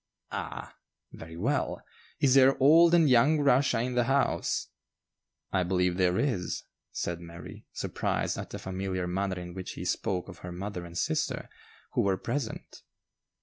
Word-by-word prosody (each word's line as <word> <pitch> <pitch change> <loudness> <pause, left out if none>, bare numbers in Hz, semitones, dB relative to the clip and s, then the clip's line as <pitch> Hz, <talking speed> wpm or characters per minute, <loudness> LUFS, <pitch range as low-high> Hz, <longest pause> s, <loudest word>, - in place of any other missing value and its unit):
"Ah! - - -6 0.3
very 80 0 -10
well. - - 0 0.4
Is 135 -2 +4
there 135 0 +6
old 165 +5 +6
and 165 -3 +5
young 140 +5 +5
Russia 135 -4 +3
in 125 +1 -2
the 120 -1 +2
house?" 135 +2 +1 0.8
"I 95 - +2
believe 90 0 +1
there 90 -1 +2
is," 120 -11 -1 0.3
said 85 -1 -3
Mary, 85 0 -10
surprised - - -2
at - - -6
the - - -6
familiar 95 -1 -3
manner 95 +1 -2
in 90 0 -8
which 95 0 -6
he - - -6
spoke 90 -2 -1
of 95 -3 -11
her 90 - -7
mother 90 0 -5
and 85 0 -8
sister, - - -1 0.4
who - - +1
were 95 -1 +1
present. 135 0 -4
95 Hz, 155 wpm, -29 LUFS, 90-130 Hz, 0.8 s, there